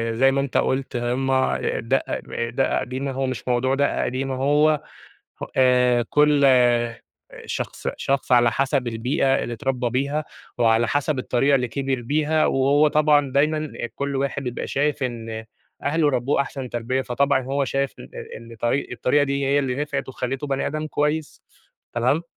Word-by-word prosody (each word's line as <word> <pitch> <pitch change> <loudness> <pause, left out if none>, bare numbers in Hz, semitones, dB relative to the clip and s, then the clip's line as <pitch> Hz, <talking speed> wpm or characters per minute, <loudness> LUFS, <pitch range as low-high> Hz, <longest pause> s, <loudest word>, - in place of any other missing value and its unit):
زي 135 +3 +4
ما 135 +1 +1
أنت 140 -1 -2
قُلت 130 0 0
هُم 125 +3 -1 0.5
دَقّة - - -1 0.3
دَقّة 130 +3 0
قديمة، 135 +2 -4
هو 135 +1 -2
مش 130 -5 -5
موضوع 125 +2 +1
دَقّة 140 +1 +1
قديمة، 130 +1 -2
هو 145 +3 +3 0.7
آآ، 125 -2 +4
كل 150 -1 +4
آآ، 120 -3 +3 0.4
شخص - - -5
شخص 135 -1 -1
على 120 -1 +5
حسب 135 +1 0
البيئة 125 +4 0
اللي 120 - -4
اتربّى 125 0 -2
بيها، 140 +5 -1 0.3
وعلى 115 -1 +3
حسب 145 +1 0
الطريقة 130 +3 +2
اللي 125 -2 0
كِبِر 135 +1 -2
بيها، 155 +5 +1
وهو 140 +3 +3
طبعًا 150 -2 +3
دايمًا 155 +2 +1 0.2
كُلّ 140 0 -3
واحد 140 0 -2
بيبقى 125 -2 -4
شايف 145 0 0
إن 115 -3 -5 0.4
أهله 150 +1 +2
ربّوه 130 +1 +1
أحسن 135 -2 -6
تربية، 120 +3 -1
فطبعًا 135 +2 +1
هو 135 +2 -1
شايف 135 0 -1 0.4
إن 115 0 -12
طريقة 120 +4 0
الطريقة 125 +5 +2
دي 140 0 -1
هي 140 +1 +3
اللي 130 -3 -1
نِفعِت 145 -2 -3
وخلّيته 130 +2 -4
بني 135 -1 -1
آدم 155 +1 -3
كويس، 150 +1 -2 0.5
تمام، 125 +7 +1
135 Hz, 155 wpm, -23 LUFS, 125-140 Hz, 0.7 s, على